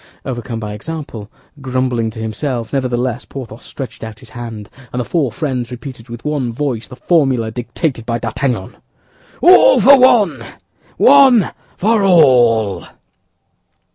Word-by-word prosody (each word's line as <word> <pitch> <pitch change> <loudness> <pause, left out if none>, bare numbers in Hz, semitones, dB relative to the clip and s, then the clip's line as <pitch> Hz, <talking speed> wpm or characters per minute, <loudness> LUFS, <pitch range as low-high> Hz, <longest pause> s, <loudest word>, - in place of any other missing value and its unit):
Overcome 120 -3 -5
by 105 -2 -6
example, 115 -4 -7 0.3
grumbling 130 -3 -1
to 110 +1 -9
himself, 115 +2 -4
nevertheless, 125 -2 -1
Porthos 120 -4 -9
stretched 135 -4 -8
out 110 -1 -8
his 115 +1 -14
hand, 115 -4 -8 0.2
and 125 - -4
the 125 - -2
four 145 -5 -1
friends 130 -5 -3
repeated 125 -1 -10
with 120 +2 -9
one 145 -5 -2
voice 120 -4 -3
the - - -11
formula 130 -8 +1
dictated 120 +3 -3
by 115 0 -2
D'Artagnan: 115 -3 -3 0.6
"All 375 +8 +6
for 275 0 +7
one, 245 -5 +3 0.5
one 265 -7 +5 0.3
for 220 +2 +2
all." 120 - +3
125 Hz, 135 wpm, -16 LUFS, 115-150 Hz, 0.6 s, for